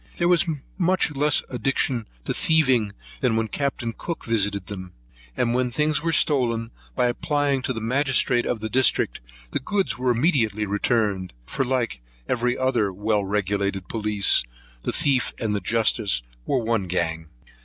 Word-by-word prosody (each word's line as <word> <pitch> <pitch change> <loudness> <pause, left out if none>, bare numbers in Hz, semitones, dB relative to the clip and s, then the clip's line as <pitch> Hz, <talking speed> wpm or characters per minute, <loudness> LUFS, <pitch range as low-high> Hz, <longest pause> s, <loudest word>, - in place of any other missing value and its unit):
They 175 - +1
are 175 0 +5 0.4
much 185 -2 +2
less 145 +1 +3
addicted 125 -2 0 0.2
to - - 0
thieving 130 -10 +2 0.3
than 125 -4 +1
when 115 0 +1
Capt. 140 -1 -2 0.2
Cook 170 - -5
visited 100 -4 0
them; 95 -2 -8 0.4
and 120 - +1
when 125 0 +1
things 150 +4 +1
were 165 +1 0
stolen, 120 -7 +1 0.2
by 125 - +2
applying 140 +2 0
to 130 - -2
the 115 -3 -3
magistrate 125 0 +2
of 115 -3 -2
the 110 - -2
district, 130 -2 +2 0.3
the - - 0
goods 190 - -1
were 125 0 +1
immediately 115 - +2
returned; 105 - 0
for, 135 - -1
like 125 - -1 0.3
every 125 0 0
other 125 -6 +1
well 105 +2 0
regulated 100 -1 -1
police, 105 - +2 0.4
the - - -1
thief 140 -5 +1
and 105 -3 -1
justice 105 - +1 0.2
were 135 - +2
of 110 - -6
one 110 -5 0
gang. 80 -2 -1
120 Hz, 155 wpm, -24 LUFS, 105-135 Hz, 0.4 s, are